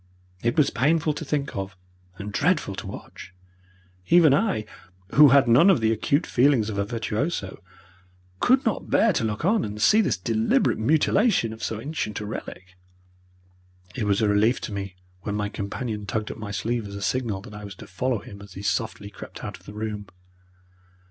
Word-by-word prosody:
It 120 +4 0
was 150 -3 +4
painful 155 +4 +2
to 155 - -6
think 145 -1 -2
of 95 -1 -5 0.4
and 100 +1 -7
dreadful 150 - +1
to - - -7
watch. 95 - -10 0.7
Even 165 -5 +6
I, 140 - +1 0.5
who 150 +1 +8
had 135 -1 +5
none 125 +11 +6
of 190 - +5
the 110 0 +2
acute 140 - +1
feelings 125 -4 +3
of 100 - -3
a 100 - +1
virtuoso, 110 - -3 0.8
could 260 +2 +3
not 225 - -1
bear 225 -3 +4
to 120 - 0
look 110 +6 -2
on 210 +3 +3
and 105 0 -5
see 210 - +5
this 195 - 0
deliberate 110 +4 +1
mutilation 155 - +2
of 110 - -12
so 110 - -3
ancient 135 -5 -4
a 105 - -5
relic. 95 -3 -8 1.2
It 105 - -2
was 100 +2 +2
a - - +3
relief 105 +4 +3
to 105 - -5
me 100 -1 -5 0.3
when 100 +1 -3
my 105 0 -1
companion 105 +1 -5
tugged 110 +1 -2
at - - -8
my 105 -1 -6
sleeve 110 +2 -2
as 100 - -8
a 100 - -6
signal 115 -6 -1
that 105 - -11
I 105 0 -8
was 100 -1 -8
to - - -11
follow 125 +6 -1
him 100 -1 -11
as 100 -2 -12
he 100 - -8
softly 100 0 -2
crept - - -10
out - - -6
of - - -23
the 105 - -8
room. 105 -1 -4
110 Hz, 195 wpm, -25 LUFS, 100-140 Hz, 1.2 s, who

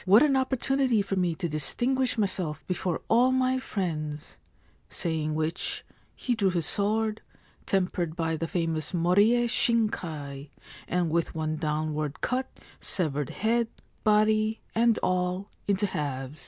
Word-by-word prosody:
What 200 +7 +7
an 285 -3 +4
opportunity 265 -3 +2
for 195 - -2
me 180 -3 +1
to 175 +1 -2
distinguish 245 - 0
myself 185 -7 -2
before 180 -1 -2
all 245 +3 +4
my 260 0 +2
friends! 155 - -4 0.3
' - - -35 0.2
Saying 155 -2 -2
which, 160 +2 -2 0.3
he 250 - -1
drew 205 -5 +2
his 170 -3 -1
sword, 215 +3 0 0.5
tempered 180 -4 0
by 165 -2 0
the 165 +1 -3
famous 165 -2 -2
Moriye 205 +8 +4
Shinkai, 160 - -1 0.4
and 175 -2 0
with 170 0 0
one 155 -1 -1
downward 155 -1 -2
cut 260 +1 -1 0.3
severed 150 -6 -1
head, 230 +2 +1 0.4
body, 215 +1 +3
and 230 0 +3
all, 185 +1 0 0.2
into 200 0 +2
halves. 145 -5 -4
185 Hz, 135 wpm, -28 LUFS, 155-220 Hz, 0.5 s, What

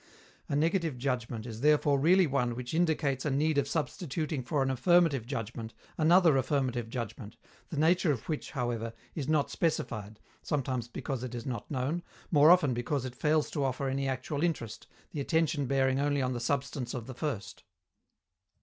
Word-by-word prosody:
A - - 0
negative 165 -1 +1
judgment 120 -3 -2
is 115 -2 -7
therefore 150 -1 +4
really 180 +6 +5
one 125 -5 0
which 125 +2 -6
indicates 155 -5 +1
a 150 - 0
need 145 +2 +2
of 140 - 0
substituting 155 -1 -2
for 135 +3 0
an 135 - 0
affirmative 140 -2 +3
judgment 115 -3 -5 0.2
another 165 -2 +5
affirmative 130 -3 0
judgment, 115 -2 -6 0.3
the 155 - -5
nature 165 +2 +3
of 120 -6 -4
which, 155 -3 -3
however, 120 -4 -3 0.2
is 140 -4 -4
not 155 -2 +1
specified, 110 -10 -2 0.2
sometimes 130 -5 -2
because 125 +1 -4
it 125 -1 -5
is 120 - -6
not 120 -5 -4
known, 140 +5 -1 0.3
more 150 -1 +7
often 175 -7 +6
because 125 +3 -2
it 130 - -5
fails 150 +3 +1
to 145 - -1
offer 135 +1 -1
any 135 +1 -1
actual 135 +2 -2
interest, 150 -10 -2 0.2
the 150 - -3
attention 155 -2 +1
bearing 135 0 +2
only 145 -1 +1
on 130 0 0
the 120 - -3
substance 130 0 -2
of 120 -3 -5
the 130 - -7
first. 125 -6 -4
135 Hz, 175 wpm, -30 LUFS, 125-155 Hz, 0.3 s, more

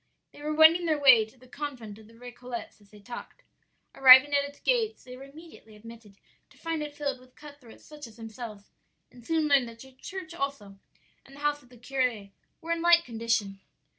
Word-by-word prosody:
"They - - -16
were 300 +1 -3
wending 325 +2 +6
their 310 -2 +1
way 255 -6 +6
to 220 +4 -21
the 255 +1 -19
convent 250 -7 -8
of 215 - -17
the 230 - -19
Récollets 245 -1 -9
as 205 - -23
they 210 0 -17
talked. 240 +4 -11 0.5
Arrived 260 0 +9
at 280 0 +3
its 285 0 -10
gates 455 -3 -1
they 250 0 -11
were 265 +2 -11
immediately 285 -6 -16
admitted, 225 -2 -14 0.3
to - - -23
find 330 -1 -4
it 295 -1 -7
filled 280 -3 -3
with 255 0 -22
cut 290 -1 -14
throats 230 -3 -17
such 295 -3 -11
as 225 0 -17
themselves, 225 -2 -10 0.4
and 245 -1 -17
soon 315 +4 0
learned 275 -5 +3
that 230 - -14
the 265 - -14
church 360 +6 -9
also 275 - -6 0.4
and 275 - -17
the - - -14
house 295 0 -1
of 245 - -23
the 250 - -17
curé 245 -5 -3 0.3
were 330 - -6
in 335 0 -1
like 340 0 +4
condition. 225 -4 -2
260 Hz, 210 wpm, -27 LUFS, 230-295 Hz, 0.5 s, Arrived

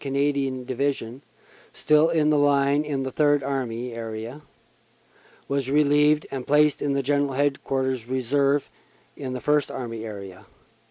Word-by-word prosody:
Canadian 140 -2 -1
Division, 130 -1 -2 0.5
still 155 +2 +3
in 155 -2 +2
the 150 - +3
line 140 0 +3
in 140 -3 -2
the 130 - -4
Third 145 -1 +2
Army 125 -3 -3
area, 115 +4 -6 1.1
was 140 -2 -1
relieved 150 +1 +3
and 135 -2 -5
placed 150 0 +3
in 140 -1 0
General 140 0 +1
Headquarters 130 -3 -1
Reserve 140 +3 +1 0.5
in 130 -3 -5
the 130 - -4
First 150 +2 +1
Army 115 -3 -6
area. 100 -4 -9
140 Hz, 130 wpm, -24 LUFS, 125-145 Hz, 1.1 s, still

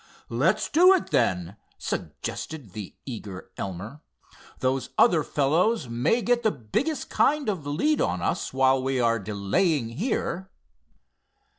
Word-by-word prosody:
"Let's 170 - +1
do 360 +5 +6
it, 370 - -3
then," 95 -4 +1 0.2
suggested 145 -11 -5
the 105 -4 -7
eager 105 -7 -7
Elmer. 100 - -6 0.6
"Those 130 0 -1
other 170 -10 +5
fellows 160 - +1
may 125 - +1
get 240 +2 +2
the 220 - +3
biggest 215 - -2
kind 295 -2 +2
of 180 -9 -2
a - - -2
lead 290 - +1
on - - 0
us - - -1
while 130 0 +3
we 130 0 0
are 115 -1 +2
delaying 110 - 0
here." 190 - -2
135 Hz, 135 wpm, -26 LUFS, -, 0.6 s, do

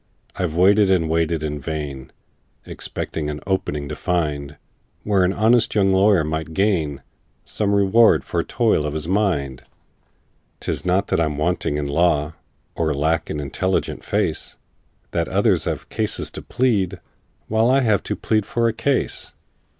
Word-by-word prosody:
"I've 85 -4 -2
waited 100 +3 +5
and 85 -4 +2
waited 80 -1 0
in 75 -1 -3
vain, 70 -3 -5 0.5
Expecting 75 -2 -4
an 75 0 -4
'opening' 75 -7 -2
to 75 - -4
find, 75 -5 -2 0.5
Where 100 -3 +2
an 90 - +2
honest 110 +4 +2
young 95 -2 +3
lawyer 95 -2 +4
might 80 +1 -4
gain 80 -9 0 0.4
Some 100 -1 0
reward 100 +4 +4
for - - -1
toil 75 - +1
of 75 - -4
his 80 +1 -3
mind. 85 -10 0 1.0
"'Tis - - -3
not 95 +2 +2
that - - +1
I'm 75 -3 -1
wanting 75 -2 0
in 75 - -2
law, 75 0 +1 0.4
Or 80 -3 -1
lack 80 +3 0
an 75 - -3
intelligent 95 +7 -2
face, - - -1 0.5
That - - -1
others - - +2
have - - -3
cases - - -2
to - - -8
plead, 100 -8 0 0.5
While 110 +2 +2
I 135 +1 +4
have 110 -6 +2
to - - -2
plead 110 -1 0
for 120 -1 +1
a 115 - 0
case. 125 +4 -1
85 Hz, 155 wpm, -21 LUFS, 75-100 Hz, 1.0 s, waited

